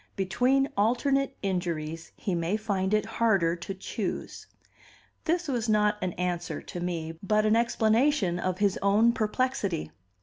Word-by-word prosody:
"Between 250 +8 +2
alternate 270 +6 +1
injuries 165 -4 -3
he 195 - -2
may 170 +4 0
find 200 -3 -1
it 215 0 +2
harder 220 -7 +2
to 185 +3 -6
choose." 190 - -5 0.8
This 345 +1 0
was 240 -5 -1
not 210 -1 +3
an 180 -2 -1
answer 180 -1 -2
to 175 - -8
me, 165 -2 -4
but 215 +2 +2
an 215 +1 +4
explanation 230 - +2
of 185 0 -1
his 200 -1 +1
own 210 +4 +4
perplexity. 215 - -1
205 Hz, 140 wpm, -28 LUFS, 180-230 Hz, 0.8 s, an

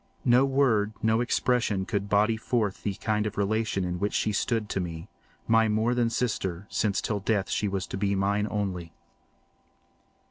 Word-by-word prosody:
No 125 +2 +5
word, 125 -6 +2
no 110 +1 +3
expression 120 -5 +1
could 100 -1 -2
body 105 +2 +3
forth 110 -3 -1
the 100 -2 -2
kind 105 0 -1
of 105 - -6
relation 100 -1 0
in 90 0 -3
which 105 +1 -1
she 110 - +1
stood 110 +1 0
to - - -1
me—my 90 +6 -2
more 110 +3 +1
than 120 -1 +1
sister, 105 -6 -2
since 100 -3 0
till 105 -2 -2
death 100 -1 0
she 105 - 0
was 95 -2 -2
to 90 - -6
be 100 0 0
mine 100 +2 +1
only. 95 -5 -3
105 Hz, 170 wpm, -27 LUFS, 100-115 Hz, -, No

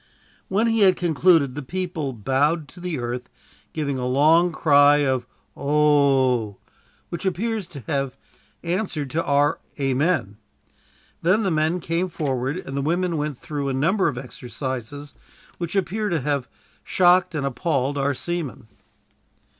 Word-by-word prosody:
When 205 +4 +1
he 225 -1 +2
had 190 -3 +6
concluded, 165 -5 +3
the 150 - -5
people 170 -1 -3
bowed 135 +7 0
to 180 - -15
the 175 -3 -3
earth, 125 0 -4 0.4
giving 140 -4 -2
a 125 - -2
long 160 +7 +4
cry 145 -2 +5
of 130 -2 0 0.3
"Oh," 140 -7 +2 0.5
which 170 - -5
appears 205 +1 -1
to 150 -6 -10
have 135 +2 -2 0.5
answered 170 -6 -2
to 165 +3 0
our 145 +1 +2 0.2
"Amen." 135 - 0 0.8
Then 190 +6 +3
the 190 - +1
men 160 +3 +1
came 170 +2 -1
forward, 135 -2 -2
and 135 -7 -7
the 140 - 0
women 170 +4 0
went 150 -3 -2
through 145 -1 -4
a - - -1
number 175 +9 +2
of 145 -6 -2
exercises, 130 +2 -6 0.5
which 170 +2 -4
appear 205 +3 0
to 165 -5 0
have 140 -2 -1 0.3
shocked 180 -1 +3
and 145 -2 -1
appalled 140 0 -1
our 140 0 0
seamen. 155 -8 -5
150 Hz, 145 wpm, -23 LUFS, 135-175 Hz, 0.8 s, had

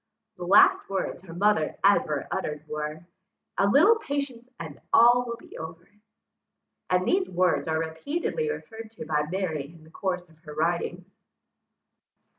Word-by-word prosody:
The 180 - -6
last 195 - +5
words 190 -2 -3
her 180 -3 -11
mother 195 -4 +2
ever 155 -8 +3
uttered 150 0 -4
were, 150 +2 -5 0.5
"A 195 - +4
little 330 - +6
patience, 280 - -4
and 160 -3 -8
all 240 +2 +6
will 235 - -3
be - - -15
over!" 160 +1 -9 1.0
and 180 +1 +1
these 375 0 +2
words 180 -1 +1
are 160 0 0
repeatedly 285 - -2
referred 225 - -7
to - - -6
by 150 -1 0
Mary 170 -6 -2
in 165 +1 -16
the 160 - -18
course 180 -1 -3
of 160 -1 -23
her 150 -2 -11
writings. 175 +3 -2
180 Hz, 150 wpm, -26 LUFS, 160-225 Hz, 1.0 s, little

